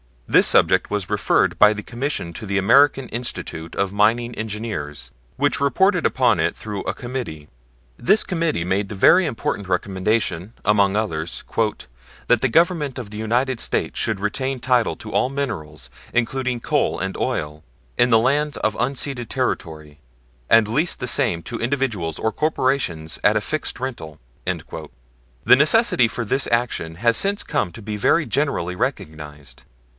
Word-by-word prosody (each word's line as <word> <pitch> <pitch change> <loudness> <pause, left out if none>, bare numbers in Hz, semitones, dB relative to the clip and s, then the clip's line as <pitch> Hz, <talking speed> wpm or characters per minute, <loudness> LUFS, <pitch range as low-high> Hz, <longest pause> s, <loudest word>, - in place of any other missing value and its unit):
This - - +5
subject - - +3
was 105 -2 -3
referred - - +1
by 105 0 +7
the 105 0 -7
Commission 125 - -4
to 110 - -8
the 100 0 -1
American 135 +6 +4
Institute 85 -8 -5
of 100 -1 0
Mining 115 +4 +2
Engineers, 100 - -5 0.2
which - - +1
reported 180 +6 +2
upon 125 -3 +2
it - - 0
through 105 -2 -6
a - - -2
Committee. 120 - -6 0.5
This 210 - +3
Committee 165 - -1
made 95 +3 -1
the 105 - -6
very 180 - +5
important 105 -6 -3
recommendation, 95 +1 -1
among 100 -1 +3
others, 85 -7 -3 0.8
"that 120 - +4
the 135 - +3
Government 160 -1 +1
of 120 -5 -6
the 105 - -8
United 120 +3 0
States - - -1
should 110 -3 -1
retain 130 +5 -2
title 125 -2 +2
to 110 - -9
all - - +2
minerals, 75 - -5 0.2
including 125 +1 -1
coal - - 0
and 95 +1 -4
oil, 75 0 -3 0.4
in 120 - +4
the 115 - +6
lands 145 +5 +1
of 110 0 -1
unceded 130 0 -2
territory, 80 - -4 0.5
and 115 -2 +5
lease 150 +10 0
the 125 - -5
same 85 -8 +1
to 120 - -5
individuals 115 - -2
or 110 - -1
corporations 130 - -1
at 105 +1 +4
a - - 0
fixed 155 +3 -2
rental." 80 - -6 0.3
The - - -2
necessity 150 - +4
for 115 +2 -4
this 135 +6 0
action 115 -9 -1
has 115 +5 +2
since 200 +1 0
come 90 - -1
to - - -10
be 105 0 -4
very 155 +9 +2
generally 140 - -1
recognized. 75 -6 -5
110 Hz, 155 wpm, -21 LUFS, 90-130 Hz, 0.8 s, by